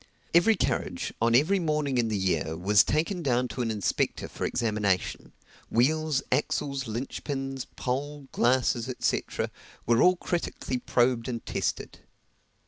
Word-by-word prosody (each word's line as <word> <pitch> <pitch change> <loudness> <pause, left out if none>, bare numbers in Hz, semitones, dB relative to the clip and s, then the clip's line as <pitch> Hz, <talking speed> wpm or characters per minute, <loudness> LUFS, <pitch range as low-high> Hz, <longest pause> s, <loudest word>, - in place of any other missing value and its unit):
Every 175 +7 +5
carriage, - - -2
on 115 +1 +4
every 165 +10 +4
morning 150 -5 0
in 115 - +2
the 110 -2 -1
year, 80 -4 0
was 100 +4 +5
taken 165 +5 0
down 125 -4 +1
to 110 +3 -4
an 115 - -1
inspector 105 -3 -1
for - - -4
examination 105 -5 -1 0.4
wheels, 150 +3 +2
axles, 140 0 0
linch 115 +5 -4
pins, 135 -2 -3
pole, 140 +2 -3
glasses, 125 0 +2
&c., - - +1 0.6
were 115 0 +3
all 180 +1 +6
critically 170 -7 -3
probed 120 -1 +1
and 120 -3 -4
tested. - - -3
130 Hz, 135 wpm, -28 LUFS, 115-150 Hz, 0.6 s, all